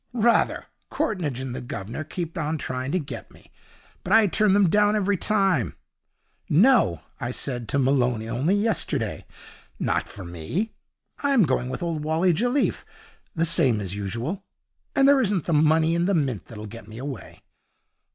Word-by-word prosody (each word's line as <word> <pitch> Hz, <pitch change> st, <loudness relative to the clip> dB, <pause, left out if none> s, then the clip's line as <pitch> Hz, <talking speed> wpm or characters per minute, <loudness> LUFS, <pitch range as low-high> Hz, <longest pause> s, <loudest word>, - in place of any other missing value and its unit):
'Rather! 235 Hz, 0 st, +2 dB, 0.2 s
Courtneidge 160 Hz, -, -2 dB
and 130 Hz, -2 st, -4 dB
the -, -, -5 dB
Guv'nor 120 Hz, +1 st, -5 dB
keep 165 Hz, +2 st, -5 dB
on 160 Hz, -1 st, -1 dB
trying 130 Hz, -1 st, -4 dB
to 185 Hz, -, +1 dB
get 150 Hz, -6 st, -6 dB
me, -, -, -20 dB, 0.5 s
but 180 Hz, -, -5 dB
I 220 Hz, 0 st, +7 dB
turn 205 Hz, +1 st, +3 dB
them 200 Hz, -1 st, +5 dB
down 205 Hz, +4 st, +3 dB
every 205 Hz, -1 st, +1 dB
time. 190 Hz, -, +1 dB, 0.7 s
"No," 185 Hz, -, +4 dB, 0.2 s
I 120 Hz, -, -3 dB
said 125 Hz, -2 st, -3 dB
to -, -, 0 dB
Malone 125 Hz, -4 st, +2 dB
only 130 Hz, -, +1 dB
yesterday, 210 Hz, 0 st, -1 dB, 0.5 s
"not -, -, -1 dB
for 100 Hz, -, -9 dB
me! 90 Hz, -, -3 dB, 0.5 s
I'm 275 Hz, -6 st, +3 dB
going 130 Hz, -4 st, 0 dB
with 130 Hz, -, -4 dB
old 165 Hz, -3 st, -2 dB
Wally 165 Hz, +4 st, +2 dB
Jelliffe, 245 Hz, -, 0 dB, 0.5 s
the 165 Hz, 0 st, +2 dB
same 150 Hz, -9 st, +3 dB
as 95 Hz, -2 st, -3 dB
usual, 115 Hz, -, -4 dB, 0.5 s
and 275 Hz, -, +5 dB
there 280 Hz, -1 st, +6 dB
isn't 200 Hz, -, 0 dB
the 170 Hz, -, 0 dB
money 160 Hz, +2 st, +4 dB
in 170 Hz, +1 st, +1 dB
the 200 Hz, -, +2 dB
Mint 135 Hz, -, -1 dB
that'll 110 Hz, -2 st, -9 dB
get 110 Hz, 0 st, -10 dB
me 110 Hz, 0 st, -10 dB
away." 130 Hz, -5 st, -8 dB
155 Hz, 165 wpm, -25 LUFS, 125-200 Hz, 0.7 s, I